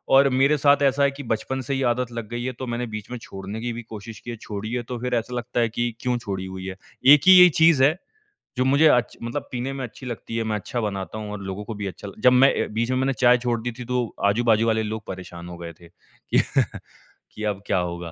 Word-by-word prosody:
और 140 +1 +7
मेरे 135 +3 +3
साथ 145 0 +4
ऐसा 140 +1 +3
है 140 - +3
कि 140 +1 -9
बचपन 120 +3 -2
से 135 +3 -3
ही 135 - -1
आदत 120 0 -1
लग 115 -2 -5
गई 120 0 -4
है 130 - -2
तो 130 - -3
मैंने 120 +1 -2
बीच 105 +1 -6
में 125 - -4
छोड़ने 95 +3 -7
की 120 0 -3
भी 120 - -6
कोशिश 110 0 -9
की 120 - -10
है, - - -5
छोड़ी 105 +1 -6
है 120 -1 -1
तो 125 +1 -6
फ़िर 125 0 -3
ऐसा 120 +2 -2
लगता 120 0 -3
है 115 -1 +2
कि 120 +1 -1
क्यों 125 -1 0
छोड़ी 95 -5 -5
हुई 95 0 -7
है। 95 -1 -5 0.4
1 150 - +6
ही - - +10
ये 180 0 +9
चीज़ 160 -5 +6
है 155 +5 +4 0.6
जो 130 - +2
मुझे 140 +4 +5
अच्छ 125 -4 +2
मतलब 120 +5 -4
पीने 130 +2 -3
में 135 -1 -5
अच्छी 125 +3 -12
लगती 115 -1 -5
है 115 - 0
मैं 110 -1 -1
अच्छा 120 +4 -4
बनाता 100 0 -4
हूँ 105 -1 -6
और 105 -1 -6
लोगों 95 +2 -5
को 110 - -5
भी 100 - -2
अच्छा 100 +2 -8
लग 100 - -11
जब 125 - +6
मैं 135 +2 +6
अ, - - -5
बीच 115 +3 0
में 130 - +1
मैंने 135 +1 +1
चाय 120 +1 +5
छोड़ 120 -2 0
दी 120 +1 -3
थी 125 - -6
तो 125 0 +2 0.2
आजू-बाजू 115 +1 +3
वाले 110 0 +2
लोग 110 +1 -5
परेशान 90 -2 -8
हो 85 - -8
गए 85 -1 -8
थे। 85 - -15
कि - - -2 0.9
कि 110 - -7
अब 100 0 -8
क्या 100 - +1
होगा? 85 -1 -4
120 Hz, 270 wpm, -24 LUFS, 105-130 Hz, 0.9 s, ही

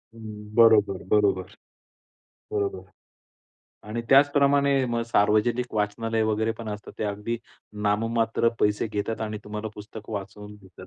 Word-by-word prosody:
हं, 105 -1 -10
बरोबर, 110 -4 +5
बरोबर 100 -3 +2 1.0
बरोबर 400 -2 -2 1.1
आणि 115 +2 -3
त्याचप्रमाणे 140 -1 +4
मग 115 - 0
सार्वजनिक 115 +3 +1
वाचनालय 110 +2 0
वगैरे 110 +1 0
पण 115 - -6
असतात. 105 0 -7
ते - - -1
अगदी 105 +3 -3 0.5
नाममात्र 115 +2 +1
पैसे 105 +1 +2
घेतात 105 +2 -3
आणि 110 -1 -3
तुम्हाला 105 +1 -5
पुस्तक 105 +1 -10
वाचवून 105 +1 -7
देतात 95 -2 -15
110 Hz, 120 wpm, -25 LUFS, 105-115 Hz, 1.1 s, बरोबर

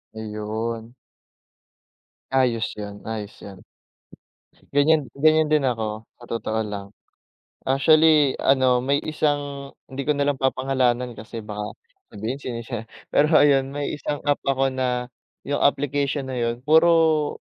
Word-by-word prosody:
Ayun. 110 +2 -5 1.4
Ayos 125 -4 +2
yun, 105 -1 -7
ayos 110 -2 -6
'yan. 95 -2 -11 1.1
Ganyan 145 0 +4
ganyan 155 +2 +4
din 150 -2 +2
ako 110 -3 -2 0.2
sa 120 - -12
totoo 110 -1 -2
lang. 100 -1 -6 0.8
Actually, 150 +1 +5
ano, 130 -2 +3
may 140 +2 +2
isang 145 -2 -2 0.2
hindi 135 +1 -5
ko 150 - +2
na 140 0 0
lang 135 - -9
papangalanan 130 -2 +1
kasi 110 +2 -8
baka 105 0 -6 0.4
sabihin 110 +6 -4
sinisi 120 -3 -5 0.3
pero 150 +3 +3
ayun 135 -2 +3
may 145 0 -2
isang 145 0 -4
app 145 0 +1
ako 135 0 +2
na 125 -1 -2 0.3
yung 145 +1 -2
application 140 -1 0
na 130 - -4
yun 120 0 -1
puro 160 0 +3
130 Hz, 125 wpm, -23 LUFS, 115-145 Hz, 1.4 s, Actually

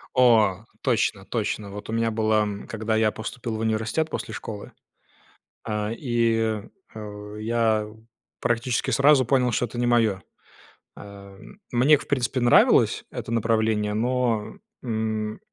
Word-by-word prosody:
О! 115 -7 +4 0.2
Точно - - 0
точно. 100 -2 -3
Вот 105 +2 -9
у - - -3
меня 115 0 +1
было, 110 -1 +2
м, 105 -1 -5
когда 110 0 -2
я 110 -1 +3
поступил 115 +1 -5
в - - -4
университет 110 +7 -1
после 110 - -5
школы, 105 -1 -7 0.9
а, 105 -1 -2
и, 115 -4 0 0.3
э, 105 -1 -8
я 110 -1 +1 0.5
практически 120 +2 0
сразу 140 +2 +5
понял, 125 0 +2
что 120 - 0
это 120 +1 -9
не 120 - +1
моё. 115 -5 +2 0.8
Эм, 100 - -13
мне 130 +5 +5
к - - -11
в - - -20
принципе, 130 -1 0
нравилось 120 0 +4
это - - -6
направление, 110 -2 +1
но, 120 -1 0 0.3
м, 110 -2 -2
110 Hz, 140 wpm, -24 LUFS, 105-120 Hz, 0.9 s, сразу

